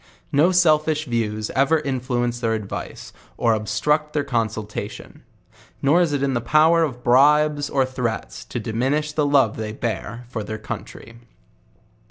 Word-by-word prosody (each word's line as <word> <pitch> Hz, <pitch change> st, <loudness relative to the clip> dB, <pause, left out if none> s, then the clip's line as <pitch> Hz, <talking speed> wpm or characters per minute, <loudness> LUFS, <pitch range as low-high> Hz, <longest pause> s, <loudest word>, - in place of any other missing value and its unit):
No 155 Hz, +6 st, +4 dB
sel 170 Hz, -4 st, +5 dB
fish 155 Hz, 0 st, -2 dB
views 110 Hz, -4 st, -2 dB
ever 140 Hz, +4 st, +2 dB
influence 125 Hz, -3 st, -2 dB
their 115 Hz, -2 st, 0 dB
advice, 105 Hz, -3 st, -7 dB, 0.2 s
or 115 Hz, -, +2 dB
obstruct 150 Hz, +8 st, 0 dB
their 145 Hz, -, 0 dB
con 120 Hz, -5 st, 0 dB
sultation. 105 Hz, -1 st, -7 dB, 0.6 s
Nor 150 Hz, +6 st, +3 dB
is 170 Hz, -4 st, +1 dB
it 140 Hz, -1 st, -1 dB
in 135 Hz, -1 st, +1 dB
the 120 Hz, -, 0 dB
power 155 Hz, +7 st, +4 dB
of 130 Hz, -6 st, -2 dB
bribes 145 Hz, +3 st, +4 dB
or 135 Hz, -2 st, +2 dB
threats 115 Hz, -8 st, -4 dB
to 120 Hz, -, -5 dB
di 115 Hz, 0 st, -5 dB
minish 140 Hz, +7 st, 0 dB
the 150 Hz, -1 st, +1 dB
love 135 Hz, -6 st, +3 dB
they 110 Hz, -1 st, -4 dB
bear 115 Hz, +1 st, -4 dB
their 110 Hz, -1 st, -4 dB
country. 115 Hz, +1 st, -8 dB
130 Hz, 160 wpm, -22 LUFS, 115-150 Hz, 0.6 s, sel